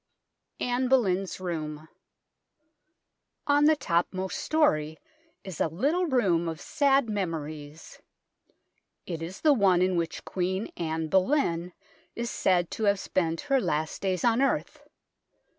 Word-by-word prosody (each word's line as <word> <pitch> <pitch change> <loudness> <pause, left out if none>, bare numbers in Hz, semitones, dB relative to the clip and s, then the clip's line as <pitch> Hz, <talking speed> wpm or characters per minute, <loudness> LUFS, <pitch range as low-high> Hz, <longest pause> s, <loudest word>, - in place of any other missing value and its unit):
ANNE 250 +1 0
BOLEYN'S 195 -9 +1
ROOM 155 -4 -5 1.6
On 290 0 +4
the 310 +1 +6
topmost 185 - -1
storey 160 - +1 0.5
is 190 -5 -6
a - - +3
little 290 - 0
room 185 - +2
of 160 -1 -6
sad 275 -3 +2
memories. 155 -6 -5 1.1
It 165 -3 -5
is 175 +4 -7
the 305 -2 +5
one 190 -7 +3
in 185 0 +1
which 170 -1 -3
Queen 190 +3 -2
Anne 160 -1 -2
Boleyn 180 - +1 0.4
is 235 -1 -3
said 175 -2 +1
to 220 - -2
have 200 -1 +3
spent 165 -4 -1
her 275 -2 +1
last 155 -4 -2
days 185 -2 -1
on 235 +1 +3
earth. 275 - -1
185 Hz, 125 wpm, -27 LUFS, 165-245 Hz, 1.6 s, the